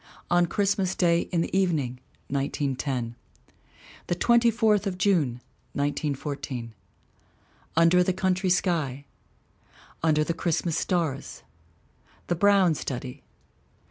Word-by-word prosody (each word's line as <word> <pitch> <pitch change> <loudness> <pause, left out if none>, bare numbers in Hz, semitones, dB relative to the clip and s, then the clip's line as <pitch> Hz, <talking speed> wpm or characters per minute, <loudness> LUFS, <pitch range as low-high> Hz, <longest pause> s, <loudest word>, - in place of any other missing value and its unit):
On 175 0 +4
Christmas 195 0 0
Day 170 -1 +2
in 170 -2 +1
the 170 - -3
Evening, 155 -10 0 0.3
1910. 135 -3 -2 0.9
The 175 - 0
Twenty 235 +5 +4
fourth 220 -3 +2
of 185 -2 -3
June, 155 -12 +1 0.3
1914. 140 -4 -3 1.0
Under 165 +2 +5
the 185 - +1
Country 185 0 0
Sky. 155 -7 0 1.0
Under 155 -1 +3
the 170 - -1
Christmas 165 0 -1
Stars. 165 -7 -2 0.8
The 175 - -1
Brown 195 -2 +4
Study. 130 -2 -5
170 Hz, 105 wpm, -26 LUFS, 140-185 Hz, 1.0 s, Under